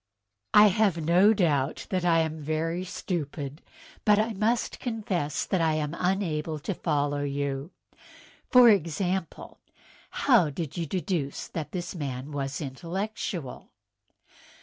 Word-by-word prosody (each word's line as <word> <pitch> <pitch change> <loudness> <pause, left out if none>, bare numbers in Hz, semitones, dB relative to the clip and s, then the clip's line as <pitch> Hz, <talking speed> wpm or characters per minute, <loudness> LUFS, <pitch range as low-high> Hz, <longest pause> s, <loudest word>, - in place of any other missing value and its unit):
" 105 0 -56
I 210 0 +9
have 200 -3 +2
no 175 +6 +4
doubt 155 -9 +1
that 185 -2 0
I 165 -2 +4
am 160 0 -3
very 160 +4 -2
stupid; 150 -5 -4 0.4
but 210 -1 +5
I 220 +2 +1
must 215 +4 0
confess 200 - -2
that 185 - 0
I 160 -1 +2
am 150 +1 -2
unable 170 -5 -1
to 150 +7 -3
follow 145 -4 -1
you. 140 +1 -2 0.8
For 250 -1 +8
example, 185 -2 0 0.7
how 225 - +5
did 150 0 -5
you 170 -2 -3
deduce 175 -5 -2
that 155 -2 -5
this 180 -2 -4
man 140 -4 -5
was 140 0 -3
intellectual?" 170 +1 -5
165 Hz, 130 wpm, -27 LUFS, 145-190 Hz, 0.8 s, I